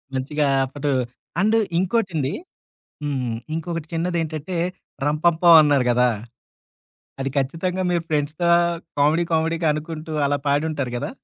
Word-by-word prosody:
మంచిగా. 145 +2 0 0.2
అప్పుడు 145 +2 -4 0.5
అండ్ 215 +3 +3 0.2
ఇంకోటండి 180 - 0 0.7
హ్మ్, 130 -5 -2 0.2
ఇంకొకటి 165 -1 -4
చిన్నది 175 +1 -1
ఏంటంటే, 160 +3 -5 0.5
'రంపంపం' 165 +2 +5
అన్నారు 145 -4 +3
కదా! 125 +1 +4 1.1
అది 135 0 -1
ఖచ్చితంగా 170 +7 -1
మీరు 170 -1 +1
ఫ్రెండ్స్‌తో 155 +3 0 0.5
కామెడీ 155 +4 +3
కామెడీగా 165 0 +1
అనుకుంటూ 155 +1 -6
అలా 145 0 +1
పాడుంటారు 145 -3 0
కదా! 160 - -3
155 Hz, 110 wpm, -22 LUFS, 145-170 Hz, 1.1 s, రంపంపం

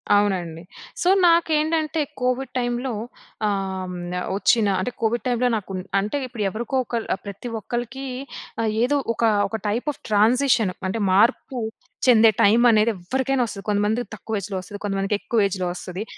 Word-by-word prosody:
అవునండి. 180 -5 0 0.4
సో 360 - +3 0.2
నాకేంటంటే 320 -2 +2 0.2
కోవిడ్ 255 +1 0
టైమ్‌లో 245 0 -1 0.5
ఆహ్, 195 -2 -2
హ్మ్, 180 - -6 0.4
వచ్చిన 210 +1 +3
అంటే 220 +7 -2
కోవిడ్ 230 +2 0
టైమ్‌లో 245 0 +2
నాకు 195 -1 -7 0.3
అంటే 210 +8 -2
ఇప్పుడు 235 -4 -4
ఎవరికో 235 +5 -4
ఒకల్ 230 -1 -3
ఆహ్, - - -18
ప్రతి 200 +4 -6
ఒక్కరికి 240 +5 -4 0.6
ఆహ్, 220 -1 +1
ఏదో 285 +4 +2 0.2
ఒక - - -2 0.3
ఒక 220 - -3
టైప్ 235 +8 -1
ఆఫ్ - - -22
ట్రాన్సిషన్ 225 -1 +3 0.2
అంటే 220 +2 -2
మార్పు 240 +5 +2 0.5
చెందే 225 -2 +7
టైమ్ 225 +4 +5
అనేది 215 +1 +4
ఎవ్వరికైనా 260 +8 0
వస్తది. 200 -2 -7
కొంతమందికి 210 +3 +1
తక్కువ 215 0 -3
ఏజ్‌‌లో 195 0 -4
వస్తది. 205 +2 -9
కొంతమందికి 195 0 0
ఎక్కువ 220 -2 +1
ఏజ్‌‌లో 185 -2 -3
వస్తది. 180 +2 -6
220 Hz, 150 wpm, -23 LUFS, 200-250 Hz, 0.6 s, చెందే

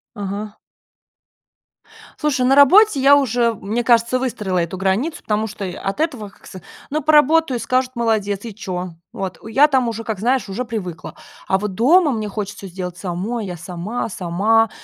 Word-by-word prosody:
Ага. 205 +1 -5 1.6
Слушай, 280 -4 0
на 270 +2 +4
работе 290 +4 +6
я 280 +1 +7
уже, 240 -3 +1
мне 215 +5 -3
кажется, 235 +1 +3
выстроила 210 -8 -2
эту 170 +2 -3
границу, 195 - -1
потому 215 +1 -1
что, 205 -1 -6
э, 180 - -5
от 195 +8 -4
этого, 255 -11 -2
как - - -22
ск 185 - -10 0.3
Ну 305 +2 -1
поработаю 305 -3 +4
и - - -6
скажут: 255 0 0
"Молодец!" 215 -3 -1
И 215 -4 -7
чё? 185 -5 -5 0.2
Вот. 190 -3 -5
У - - -11
я 270 +7 +5
там 260 -4 +1
уже, 225 0 -5
как 220 -4 -4
знаешь, 245 +2 +1
уже 215 +6 -3
привыкла. 190 -8 -6 0.3
А 190 - +2
вот 205 -1 -4
дома 300 - +4
мне 215 -3 -3
хочется 200 -1 -6
сделать 180 -1 -6
самой, 200 +6 -4
я 180 -2 -6
сама, 180 +8 -5
сама. 210 +5 +1
220 Hz, 180 wpm, -20 LUFS, 195-255 Hz, 1.6 s, я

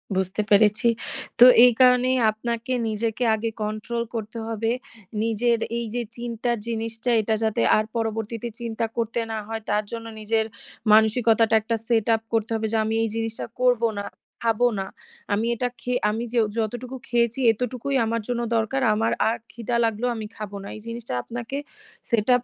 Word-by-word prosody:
বুঝতে 190 +2 0
পেরেছি। 210 +3 +4 0.5
তো 245 - +11 0.2
এই 245 - +7
কারণেই 255 0 +5
আপনাকে 235 +3 -3
নিজেকে 220 +2 -1
আগে 225 +1 -2
কন্ট্রোল 215 +3 -3
করতে 220 +1 -5
হবে। 225 0 -1 0.5
নিজের 230 +1 +2 0.2
এই 235 - -2
যে 245 - 0 0.2
চিন্তার 235 0 -2
জিনিসটা 225 +1 -3
এটা 220 +1 0
যাতে 220 +1 +1 0.2
আর 215 - +1
পরবর্তীতে 225 +1 -2
চিন্তা 230 -1 -2
করতে 230 0 -1
না 220 - -2
হয় 225 0 -4
তার 210 +1 +2
জন্য 230 -1 -5
নিজের 220 +1 +1 0.5
মানসিকতাটা 220 0 +4
একটা 230 +2 -1
সেটআপ 225 -1 +2
করতে 225 0 +1
হবে 220 0 -1
যে 225 - +3
আমি 220 +1 -1
এই 225 - 0
জিনিসটা 225 0 -3 0.2
করবো 245 -2 +4
না, - - -3 0.4
খাবো 230 +1 +3
না। 190 - -2 0.5
আমি 215 +3 +1
এটা 245 +2 0
খেয়ে 250 0 -1
আমি 220 +2 -2
যে 240 - +3 0.2
যতটুকু 240 +4 -3
খেয়েছি 235 +1 +1
এতটুকুই 250 +4 -3
আমার 230 +1 -1
জন্য 240 -1 -1
দরকার। 230 +4 0
আমার 225 +2 +1 0.2
আর 230 - -1
ক্ষিদা 235 +1 -3
লাগলেও 225 +2 0
আমি 220 -1 -5
খাবো 210 -1 -6
না। - - -8
এই 215 - -9
জিনিসটা 230 - -5
আপনাকে 240 +3 -5 0.5
সেটআপ 240 +1 +3
230 Hz, 165 wpm, -24 LUFS, 220-240 Hz, 0.5 s, তো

